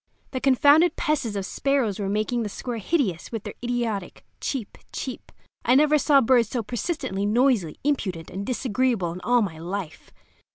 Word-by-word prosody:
The 260 Hz, -, -3 dB
confounded 285 Hz, +5 st, +5 dB
pests 300 Hz, -10 st, -1 dB
of 195 Hz, -1 st, -2 dB
sparrows 260 Hz, -5 st, 0 dB
were 195 Hz, -1 st, -2 dB
making 215 Hz, +4 st, 0 dB
the 215 Hz, -, -2 dB
square 235 Hz, +3 st, -5 dB
hideous 210 Hz, -, -1 dB
with 225 Hz, -3 st, -4 dB
their -, -, -6 dB
idiotic 235 Hz, -6 st, -3 dB
"cheep, 250 Hz, -7 st, -4 dB
cheep." 260 Hz, -, -6 dB, 0.3 s
I 245 Hz, -, +4 dB
never 300 Hz, +2 st, +5 dB
saw 280 Hz, -1 st, +5 dB
birds 240 Hz, -2 st, +3 dB
so 240 Hz, -3 st, -2 dB
persistently 215 Hz, -, -2 dB
noisy, 230 Hz, -, +2 dB
impudent, 190 Hz, -, -1 dB
and 195 Hz, +2 st, -4 dB
disagreeable 240 Hz, -5 st, 0 dB
in 180 Hz, +2 st, -7 dB
all 245 Hz, -1 st, +3 dB
my 165 Hz, -6 st, -5 dB
life. 175 Hz, 0 st, -6 dB
235 Hz, 165 wpm, -25 LUFS, 200-265 Hz, 0.3 s, confounded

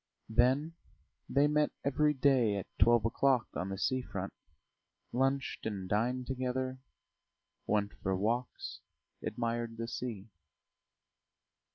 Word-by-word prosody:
Then 130 Hz, +8 st, +3 dB, 0.6 s
they 140 Hz, +2 st, +4 dB
met 150 Hz, 0 st, +3 dB, 0.2 s
every 150 Hz, +2 st, +3 dB
day 130 Hz, -6 st, +4 dB
at 100 Hz, -, -3 dB
twelve 120 Hz, -2 st, +5 dB
o'clock 125 Hz, +1 st, +3 dB
on 95 Hz, -, -3 dB
the 95 Hz, -, -3 dB
sea 130 Hz, +5 st, +1 dB
front, 100 Hz, -5 st, -5 dB, 0.8 s
lunched 135 Hz, -1 st, 0 dB
and 100 Hz, -4 st, -4 dB
dined 120 Hz, +6 st, +1 dB
together, 130 Hz, 0 st, -2 dB, 0.9 s
went 105 Hz, -1 st, +1 dB
for 95 Hz, -1 st, 0 dB
walks, 115 Hz, +6 st, -2 dB, 0.4 s
admired 115 Hz, -1 st, -2 dB
the 115 Hz, 0 st, -3 dB
sea. 115 Hz, -4 st, -5 dB
120 Hz, 110 wpm, -33 LUFS, 110-130 Hz, 0.9 s, twelve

